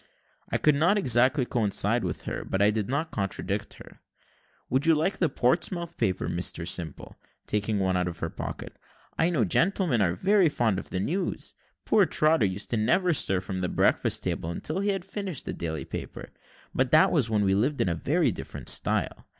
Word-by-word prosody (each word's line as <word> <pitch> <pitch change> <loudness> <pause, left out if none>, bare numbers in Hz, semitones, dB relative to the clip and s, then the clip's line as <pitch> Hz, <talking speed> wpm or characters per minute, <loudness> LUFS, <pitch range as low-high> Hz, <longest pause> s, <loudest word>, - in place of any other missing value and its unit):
I - - +1
could 150 - +3
not 170 +9 +3
exactly 130 - +3
coincide 110 0 +1
with 85 -4 -4
her, - - -4
but 95 - -2
I 100 +1 +4
did 105 0 -2
not 155 +5 -1
contradict 100 -2 -3
her. - - -15 0.7
"Would 135 +5 0
you 165 - +6
like 160 +6 0
the 170 - +2
Portsmouth 170 +7 0
paper, 95 -1 -1
Mr 85 -1 -2
Simple?" 85 -3 -3 0.3
taking 105 0 -1
one 95 -1 +1
out 90 0 0
of 85 -1 -5
her - - -4
pocket; - - -7 0.4
"I 165 - +3
know 145 -11 +1
gentlemen 170 - +1
are 85 -3 +1 0.3
fond 110 -9 0
of - - -10
the 90 - -2
news. 175 - -2 0.3
Poor 200 -4 +4
Trotter 155 -8 +3
used 100 +5 -4
never 125 - +2
to - - +4
stir 95 - +1
from 95 0 -5
the 90 -1 -1
breakfast - - +1
table 80 - -2
until 155 - -3
he 200 +1 0
had 195 -3 -2
finished 195 -6 -5
the - - -4
daily 80 -4 -4
paper - - -7 0.4
but 130 0 +1
that 160 +8 +5
was 135 -9 +1
when 105 -2 +1
we 95 -1 +2
lived 130 +9 +1
in 85 -2 +1
very 145 - +1
different - - -5
style. - - -1
120 Hz, 190 wpm, -27 LUFS, 95-160 Hz, 0.7 s, you